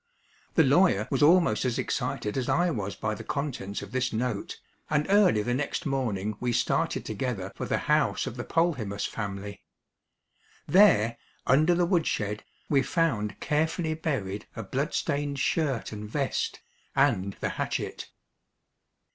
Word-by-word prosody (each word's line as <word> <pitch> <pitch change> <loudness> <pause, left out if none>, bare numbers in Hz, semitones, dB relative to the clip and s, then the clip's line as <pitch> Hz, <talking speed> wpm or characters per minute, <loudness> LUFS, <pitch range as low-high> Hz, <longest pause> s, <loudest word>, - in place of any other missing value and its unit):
The 160 - +6
lawyer 140 - +4
was - - +1
almost 165 -6 +5
as 125 -2 0
excited 105 - -2
as 130 -2 -1
I 175 +1 +2
was 100 -7 -3
by 110 +2 -2
the 105 - -7
contents 135 -9 -3
of - - -10
this 130 0 0
note, 115 -2 -3 0.3
and 150 0 +2
early 195 - +5
the 120 - -1
next 140 +3 -2
morning 110 -7 -1
we 125 -1 -1
started - - 0
together 105 -4 -3
for - - -4
the - - +1
house - - +2
of - - -5
the - - -4
Polhemus 125 -13 0
family. 100 -1 -5 1.1
There, 120 - +5 0.3
under 155 +7 +4
the 175 0 +3
woodshed, 105 - 0 0.2
we 140 -2 +3
found 115 - 0
carefully 160 +2 0
buried 130 - -3
a - - -5
bloodstained 145 0 -1
shirt 140 -3 0
and 105 0 -7
vest, 135 +3 -2 0.3
and 95 +1 +2
the - - -3
hatchet. - - -3
130 Hz, 145 wpm, -28 LUFS, 105-155 Hz, 1.1 s, The